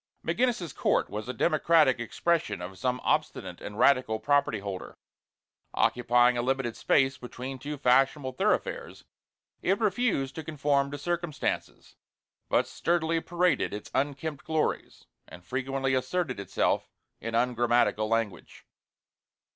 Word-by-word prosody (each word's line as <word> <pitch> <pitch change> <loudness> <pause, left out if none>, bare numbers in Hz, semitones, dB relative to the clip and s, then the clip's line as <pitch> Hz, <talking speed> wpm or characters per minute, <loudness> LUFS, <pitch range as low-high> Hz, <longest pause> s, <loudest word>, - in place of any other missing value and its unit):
McGinnis's 235 - 0
Court - - +1
was 105 +4 -5
a - - +1
democratic 155 -1 +3
expression 165 - 0
of 90 +1 -8
some 125 +2 0
obstinate - - -1
and 105 - -7
radical 125 -5 +3
property 140 -1 +2
holder. 100 -2 -7 0.8
Occupying 120 0 +3
a - - +2
limited 130 -2 -1
space 135 -1 +2
between 130 +2 -7
two 145 +3 -5
fashionable 135 +1 +3
thoroughfares, 465 - -1 0.6
it 195 +2 +1
refused 200 - 0
to 160 - -6
conform 145 -2 0
to 145 - -5
circumstances, 175 +1 -3 0.5
but - - +2
sturdily 165 -1 0
paraded 175 -9 +1
its 105 - -9
unkempt 145 +2 -2
glories, 160 -1 -2 0.2
and 90 +2 -13
frequently 135 +2 -1
asserted 130 - -1
itself 100 - 0 0.3
in 115 0 -4
ungrammatical 120 -2 +2
language. 115 -2 -3
135 Hz, 125 wpm, -28 LUFS, 120-160 Hz, 0.8 s, democratic